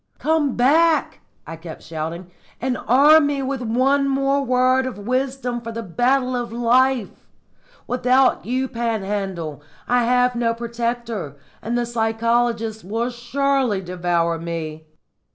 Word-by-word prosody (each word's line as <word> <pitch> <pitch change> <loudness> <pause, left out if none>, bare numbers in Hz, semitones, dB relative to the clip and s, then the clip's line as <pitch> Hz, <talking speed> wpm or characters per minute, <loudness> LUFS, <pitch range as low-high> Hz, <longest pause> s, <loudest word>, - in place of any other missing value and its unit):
"Come 305 -4 +1
back," 315 +6 +3 0.3
I 165 - -7
kept 165 0 -10
shouting, 165 +3 -6 0.3
"and 255 0 -1
arm 290 +4 +6
me 280 -1 -1
with 265 -1 -3
one 260 +4 +2
more 275 +1 +1
word 255 0 +2
of 255 - -6
wisdom 255 +2 -2
for 230 0 -6
the 230 0 -5
battle 250 +7 +1
of 240 -2 -3
life! 240 0 +1 0.6
Without 255 +1 +2
you, 255 +3 -1
Panhandle, 200 - -3 0.3
I 245 -1 +2
have 250 +1 +2
no 230 -1 0
protector, 235 - -4 0.2
and 235 +2 -2
the 240 - 0
psychologists 230 -1 0
will 225 +6 -2
surely 255 -2 0
devour 175 -2 -1
me." 160 -2 -6
240 Hz, 130 wpm, -21 LUFS, 210-260 Hz, 0.6 s, arm